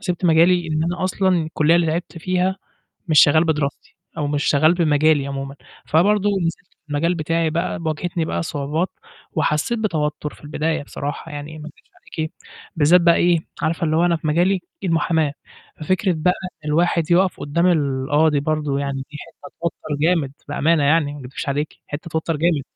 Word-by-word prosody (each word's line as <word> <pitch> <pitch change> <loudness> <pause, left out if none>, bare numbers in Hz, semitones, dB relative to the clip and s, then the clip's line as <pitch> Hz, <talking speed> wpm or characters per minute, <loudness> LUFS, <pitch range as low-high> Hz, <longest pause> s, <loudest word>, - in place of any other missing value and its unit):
سِبت 180 -1 -3
مجالي 170 +1 +4
إن 155 0 0
أنا 175 +2 -2
أصلًا 190 +1 0
الكلّية 155 +1 +2
اللي 175 -1 +2
تعبت 165 +2 -3
فيها 185 +3 0 0.5
مش 155 -3 +5
شغّال 155 +2 +4
بدراستي 150 -4 -2 0.2
أو 150 - -1
مش 145 0 -1
شغّال 155 +3 +4
بمجالي 155 -4 +2
عمومًا، 135 0 -5 0.3
فبرضه 205 +5 +3
نزِلت 180 -3 -2
في 155 - -36
المجال 165 +4 0
بتاعي 165 0 0
بقى 170 +2 -2
ب 170 - -8
واجهتني 165 +1 -2
بقى - - -2
صعوبات 155 +3 -2 0.4
وحسّيت 155 +8 0
بتوتّر 150 -7 -2
في - - -19
البداية 155 +1 -2
بصراحة 145 +3 -6
يعني 145 +2 -7
ما 155 - -8
أكدبش 155 - -16 0.3
عليكِ 160 0 -2 0.4
بالذات 165 +3 +5
بقى 170 0 +5
إيه، 175 -1 +3 0.2
عارفة 165 +1 0
اللي 155 - +1
هو 170 +2 +3
أنا 175 -1 +2
في 155 - -5
مجالي 175 +5 +3 0.3
إيه 185 - -1
المُحاماة 160 -3 +1 0.5
ففكرة 185 +4 +1
بقى 180 +3 +2 0.3
إن - - -2
الواحد 170 +1 +1
يوقف 185 +2 +3
قدّام 170 +5 +1
القاضي 145 -1 +2
برضه 150 -1 -1
يعني 140 -1 -2
دي 150 - -8
حتّة 185 - -13
توتّر 155 -3 -3
جامد 160 -4 +2 0.2
بأمانة 150 +2 +2
يعني 145 0 +2
ما 145 - -9
أكدبش 135 +1 -6
عليكِ 145 +2 -2
حتّة 150 +3 -6
توتّر 160 +1 -1
جامد. 165 -1 +1
160 Hz, 180 wpm, -21 LUFS, 150-170 Hz, 0.5 s, مش